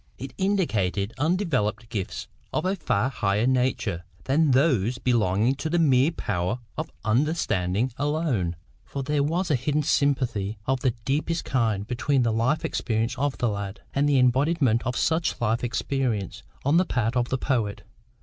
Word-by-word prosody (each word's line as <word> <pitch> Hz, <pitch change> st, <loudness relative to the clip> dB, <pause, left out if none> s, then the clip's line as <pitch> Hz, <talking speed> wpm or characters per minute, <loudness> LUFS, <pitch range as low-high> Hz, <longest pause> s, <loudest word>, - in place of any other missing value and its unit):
It 135 Hz, 0 st, -7 dB
indicated 115 Hz, -, 0 dB
undeveloped 145 Hz, -, 0 dB
gifts 100 Hz, -4 st, -4 dB, 0.2 s
of -, -, -1 dB
a 190 Hz, +2 st, +1 dB
far 130 Hz, -, 0 dB
higher 105 Hz, -3 st, 0 dB
nature 125 Hz, -9 st, 0 dB, 0.2 s
than 150 Hz, +3 st, +2 dB
those 130 Hz, -, +3 dB
belonging 115 Hz, -1 st, +2 dB
to 160 Hz, -, -3 dB
the 175 Hz, -, +1 dB
mere 140 Hz, -3 st, +4 dB
power 105 Hz, -, -2 dB, 0.2 s
of -, -, -4 dB, 0.2 s
understanding 110 Hz, -, +1 dB
alone. 145 Hz, -, 0 dB, 0.3 s
For 140 Hz, -, -5 dB
there 150 Hz, +1 st, 0 dB
was 170 Hz, +4 st, 0 dB
a -, -, +4 dB
hidden 150 Hz, +4 st, 0 dB
sympathy 125 Hz, -8 st, +1 dB
of 130 Hz, 0 st, +1 dB
the 125 Hz, -2 st, 0 dB
deepest 155 Hz, +4 st, -1 dB
kind 110 Hz, -6 st, 0 dB
between 130 Hz, +3 st, +1 dB
the 115 Hz, -2 st, +1 dB
life 120 Hz, +8 st, +1 dB
experience 115 Hz, 0 st, -1 dB
of 145 Hz, -1 st, 0 dB
the 120 Hz, -, +1 dB
lad, 100 Hz, -1 st, -5 dB
and 145 Hz, +1 st, +2 dB
the 140 Hz, -, +4 dB
embodiment 130 Hz, -1 st, +3 dB
of 125 Hz, -, -1 dB
such 165 Hz, +1 st, +1 dB
life 115 Hz, +1 st, 0 dB
experience 120 Hz, -5 st, -1 dB, 0.2 s
on 145 Hz, +4 st, +4 dB
the 185 Hz, -, +4 dB
part 120 Hz, -6 st, -1 dB
of 120 Hz, -1 st, +1 dB
the 130 Hz, -, 0 dB
poet. 110 Hz, -7 st, -1 dB
130 Hz, 160 wpm, -25 LUFS, 110-145 Hz, 0.3 s, mere